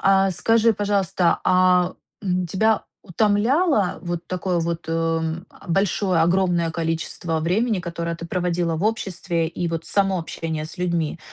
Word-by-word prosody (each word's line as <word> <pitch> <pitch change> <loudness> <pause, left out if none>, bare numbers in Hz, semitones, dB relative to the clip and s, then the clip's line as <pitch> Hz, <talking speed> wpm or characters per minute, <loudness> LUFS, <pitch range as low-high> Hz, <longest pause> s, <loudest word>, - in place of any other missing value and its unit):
А, 195 0 +4
скажи, 225 +5 +3
пожалуйста, 200 -4 +1
а 185 -1 +3 0.3
тебя 190 +3 +1 0.2
утомляло 215 - +2
вот 175 -1 -4
такое 185 -1 -1
вот, 170 0 -3
м, 165 +1 -1
а, - - -18
большое, 190 -1 +1
огромное 175 -1 +2
количество 165 0 -2
времени, 200 +5 +1
которое 170 -1 -4
ты 170 - -8
проводила 175 -2 -1
в 180 - -2
обществе, 180 -6 -1
и 175 +1 -3
вот 165 0 -3
само 195 -2 +1
общение 160 -1 -4
с 175 - -10
людьми? 170 -3 -1
180 Hz, 140 wpm, -22 LUFS, 165-195 Hz, 0.3 s, А